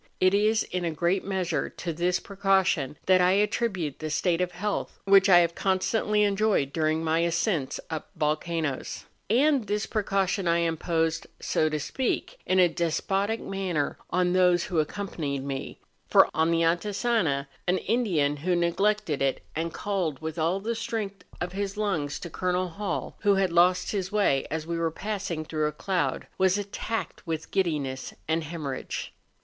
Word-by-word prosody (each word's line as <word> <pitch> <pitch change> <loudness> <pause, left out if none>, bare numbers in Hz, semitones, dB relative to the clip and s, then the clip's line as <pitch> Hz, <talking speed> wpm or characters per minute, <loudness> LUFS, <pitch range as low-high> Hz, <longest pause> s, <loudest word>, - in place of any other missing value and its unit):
It 185 +1 +4
is, 215 +2 +3
in 180 0 -4
a 170 - 0
great 175 +4 0
measure, 185 -4 -1
to 170 -2 -5
this 175 +3 +1
pre¬ 200 - -11
caution 190 -8 +2
that 185 -1 +5
I 180 +1 +4
attribute 200 - 0
the 155 - -4
state 170 +3 +1
of 180 -1 -1
health 205 +4 -3
which 195 0 +6
I 175 -2 +8
liave 170 - -5
constantly 210 +3 +1
enjoyed 200 -8 +1
during 160 0 +1
my 160 0 +2
ascents 170 -3 0
up 160 -1 -4
vol¬ 150 0 +1
canoes. 160 -6 -3 0.2
And 265 0 +3
this 210 +1 0
precaution 195 -3 0
I 170 0 +3
imposed, 165 -1 0
so 155 - +1
to 155 0 -2
speak, 265 - -2
in 185 - +2
a 180 -1 +7
despotic 195 +6 -1
manner 185 -7 -2
on 180 0 +1
those 180 -1 +4
who 170 - -1
accompanied 150 -5 -3
me; 135 -1 -5 0.3
for, - - +6
on 160 +1 +2
the 165 0 +2
Antisana, 175 - +1 0.2
an 180 +1 +3
Indian 175 -13 +1
who 175 +5 0
neglected 175 -1 +1
it, 135 -1 0
and 165 +2 -2
called 180 -10 -2
with 160 +1 -5
all 170 +4 +1
the 225 +4 -2
strength 215 -4 -4 0.2
of 175 0 -3
his 200 +1 -3
lungs 165 -9 -1
to 170 - -6
Col. 180 +1 -1
Hall, 200 +4 -4
who 205 -1 +3
had 190 -3 +1
lost 180 +1 +4
his 190 -3 -2
way 200 -10 +2
as 155 +1 -3
we 170 0 -2
were 165 -1 +1
passing 185 -3 -4
til 155 0 -5
rough 150 -1 0
a - - -31
cloud, 180 -9 -1
was 190 +1 +4
attacked 205 0 -4
with 160 -1 -4
giddiness 150 -8 -1
and 160 +1 +1
hemorrhage. 150 -4 -5
180 Hz, 175 wpm, -27 LUFS, 160-200 Hz, 0.3 s, I